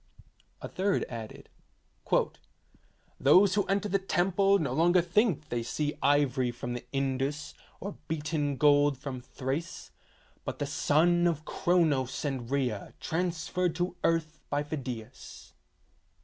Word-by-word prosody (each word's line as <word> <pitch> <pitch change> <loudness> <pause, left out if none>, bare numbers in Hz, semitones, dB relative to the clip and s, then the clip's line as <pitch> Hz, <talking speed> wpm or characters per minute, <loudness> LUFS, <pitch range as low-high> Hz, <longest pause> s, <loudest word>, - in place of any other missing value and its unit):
A - - -3
third 195 +1 0
added: 115 -3 -8 1.7
'Those 180 +8 +6
who 205 0 +2
enter 200 +2 0
the 195 0 +1
temple 195 +1 +2
no 140 -8 -1
longer 175 +5 +4
think 180 - +2
that 150 - -28
they 120 -1 0
see 145 +5 -2
ivory 135 -3 +2
from 120 0 -5
the 120 - -5
Indus, 135 +2 -2 0.3
or 200 +1 -6
beaten 150 -2 -1
gold 145 0 +4
from 130 -2 -6
Thrace, 135 +7 -5 0.5
but - - -4
the 145 - -2
son 165 +5 +3
of 155 -2 -1
Chronos 155 -7 +1
and 130 -5 -3
Rhea 125 -7 -2
transferred 175 +1 -1
to 175 +1 -2
earth 165 -1 0
by 145 0 0
Phidias." 130 -5 -7
150 Hz, 130 wpm, -29 LUFS, 135-175 Hz, 1.7 s, Those